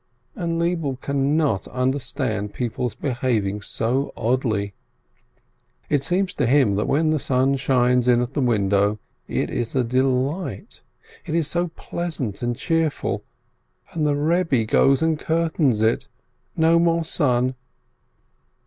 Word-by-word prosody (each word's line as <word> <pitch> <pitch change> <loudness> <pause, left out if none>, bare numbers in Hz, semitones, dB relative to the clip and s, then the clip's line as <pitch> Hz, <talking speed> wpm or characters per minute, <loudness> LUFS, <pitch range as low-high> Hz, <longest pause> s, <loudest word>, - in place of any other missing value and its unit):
And 170 -6 -2
Lebele 165 -6 -1
cannot 140 -5 0
understand 125 -5 -2
people's 120 -1 -2
behaving 120 -6 -1
so 125 +7 -1
oddly. 110 -4 0 1.2
It 145 -2 +2
seems 185 +4 0
to 135 - 0
him 130 -5 +4
that 105 - 0
when 155 +2 +2
the 155 - +1
sun 130 +1 +1
shines 125 -1 +2
in 120 -1 +5
at 125 +2 -2
the 145 - 0
window, 100 -3 +2 0.3
it - - -2
is 120 +1 -3
a 130 - +3
delight, 130 - -1 0.5
it 155 - -2
is 165 -3 +1
so 175 +2 0
pleasant 160 - -5
and 120 -1 -1
cheerful, 165 -2 -1 0.7
and 160 - -2
the 150 -1 +2
Eebbe 150 -5 +1
goes 135 +5 +3
and 160 -2 +1
curtains 160 -9 +1
it 115 +4 +1 0.3
— 125 +1 -46
no 165 +1 +4
more 170 -1 +2
sun 130 -5 +1
135 Hz, 135 wpm, -23 LUFS, 120-160 Hz, 1.2 s, in